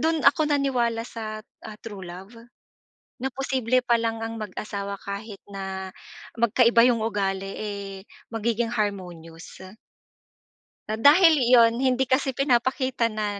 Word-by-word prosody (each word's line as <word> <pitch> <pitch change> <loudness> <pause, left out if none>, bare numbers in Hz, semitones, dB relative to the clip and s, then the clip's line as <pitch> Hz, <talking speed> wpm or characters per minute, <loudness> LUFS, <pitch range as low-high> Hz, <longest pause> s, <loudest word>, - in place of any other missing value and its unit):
do'n 320 -1 0
ako 295 +2 +4
naniwala 250 -5 +1
sa, 215 -2 -7 0.2
ah, 210 - -9
true 210 -4 -8
love, 185 +5 -10 0.9
na 265 - -1
posible 255 -2 0
pa 235 -1 +3
lang 225 0 -2
ang 225 0 -6
mag-asawa 200 0 -5
kahit 200 +1 -7
na 190 -1 -5 0.5
magkaiba 235 +1 +4
yong 230 -3 +1
ugali, 195 -3 -2
eh, 200 -2 -5 0.4
magiging 230 +1 -1
harmonious. 180 -8 -5 1.3
Na 215 +1 -2
dahil 315 +4 +6
iyon, 235 -1 +5
hindi 260 0 +2
kasi 265 0 0
pinapakita 260 -2 +1
na 210 -2 -3
230 Hz, 125 wpm, -25 LUFS, 200-255 Hz, 1.3 s, dahil